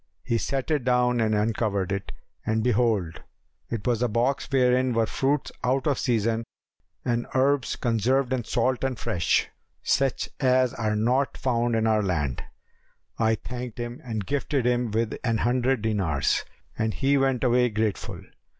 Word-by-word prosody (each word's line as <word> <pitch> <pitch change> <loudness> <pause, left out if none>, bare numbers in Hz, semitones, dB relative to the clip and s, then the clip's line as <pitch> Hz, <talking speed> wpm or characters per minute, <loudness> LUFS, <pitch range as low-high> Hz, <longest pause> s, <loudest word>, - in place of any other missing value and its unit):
He 115 - 0
set 135 +5 -2
it 150 -4 +1
down 125 -1 +2
and 110 -1 +2
uncovered 105 -3 0
it, 100 0 -3 0.3
and 110 0 0
behold 110 -8 +1 0.5
it 115 -3 -4
was 120 -2 +1
a 125 - +3
box 120 +5 0
wherein 130 -1 +3
were 115 -1 +3
fruits 135 +5 -1
out 130 +1 +1
of 145 -3 +1
season 115 -2 +1 0.6
and 120 -1 0
herbs 135 0 +2
conserved 125 +3 +1
in 125 -2 -1
salt 125 +3 0
and 130 -2 -1
fresh, 100 -8 +1 0.4
such 135 -2 +1
as 130 -2 +3
are 110 -2 -1
not 125 +6 +1
found 120 -2 0
in 110 0 +1
our 110 -1 +3
land. 75 -10 -1 0.8
I 110 0 +3
thanked 125 0 -7
him 120 0 -5
and 110 -5 -4
gifted 140 0 -1
him 125 -1 +1
with 110 +1 -1
an 115 -2 +1
hundred 125 0 +1
dinars, 95 -10 0 0.3
and 110 0 -1
he 140 +1 +2
went 135 -2 +1
away 125 0 +3
grateful. 110 -2 -2
120 Hz, 160 wpm, -26 LUFS, 110-130 Hz, 0.8 s, a